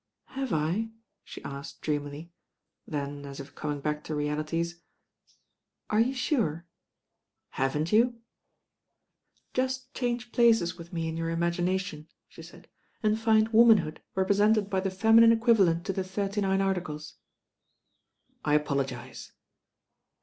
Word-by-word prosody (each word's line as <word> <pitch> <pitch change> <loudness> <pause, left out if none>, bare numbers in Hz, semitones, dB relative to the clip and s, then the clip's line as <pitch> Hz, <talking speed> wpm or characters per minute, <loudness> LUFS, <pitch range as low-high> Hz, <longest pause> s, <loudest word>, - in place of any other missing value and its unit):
"Have 270 -3 -4
I?" 170 +8 0 0.3
she - - -10
asked 140 0 -8
dreamily; 145 +2 -4 0.6
then 145 -1 -4
as 140 0 -8
if 140 +1 -9
coming 145 -2 -4
back 150 +1 -2
to 155 - -3
realities, 155 +3 -2 1.1
"Are 215 - +3
you 255 +4 +2
sure?" 220 - 0 0.8
"Haven't 150 +5 -1
you?" 235 +3 +4 1.4
"Just 260 +1 -2
change 245 -1 -2
places 225 -7 +3
with 170 -1 -11
me 165 -2 -2
in 160 0 -4
your 165 0 -2
imagina 170 +2 0
tion," 155 -5 -7 0.2
she - - -13
said, - - -14 0.4
"and 215 +1 +2
find 220 -1 +3
womanhood 220 -9 +5
represented 205 +2 +2
by 190 - +1
the 195 +1 -1
feminine 225 +4 +6
equivalent 210 -7 +3
to 195 - -1
the 190 - -2
Thirty 200 +2 -2
Nine 195 0 +1
Articles." 175 -6 -3 1.3
"I 150 -1 +2
apologise." 140 -4 -3
180 Hz, 130 wpm, -28 LUFS, 150-220 Hz, 1.4 s, feminine